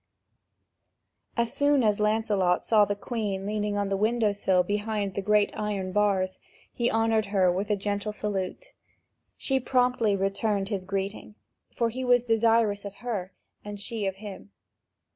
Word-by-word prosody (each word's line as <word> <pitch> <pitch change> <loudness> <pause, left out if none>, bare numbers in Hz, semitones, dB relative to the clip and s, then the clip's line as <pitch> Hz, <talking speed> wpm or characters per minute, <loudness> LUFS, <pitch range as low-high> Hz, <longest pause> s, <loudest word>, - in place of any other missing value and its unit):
As 235 -1 0
soon 285 -2 +3
as 210 -1 +2
Lancelot 210 -4 +1
saw 215 -2 +5
the 205 - -2
Queen 205 -3 -3
leaning 210 0 -1
on 200 -1 -1
the 195 - 0
window 215 +1 +2
sill 190 -2 +2
behind 205 0 -2
the 200 - -2
great 210 +1 +3
iron 200 -3 -2
bars, 190 -2 +1 0.3
he 240 0 0
honoured 225 -1 +1
her 190 -3 +3
with 195 +4 -2
a 210 - +3
gentle 205 +1 -2
salute. 210 - -4 0.6
She 270 -1 0
promptly 245 -4 +2
returned 195 +1 -1
his 195 -4 -3
greeting, 195 +2 -4 0.4
for 230 -1 +1
he 260 +3 -4
was 245 -1 +4
desirous 225 -3 +2
of 200 -1 -7
her, 200 -6 -3 0.3
and 205 -1 -7
she 210 0 -3
of 190 - -2
him. 195 - -9
210 Hz, 155 wpm, -27 LUFS, 195-225 Hz, 0.6 s, saw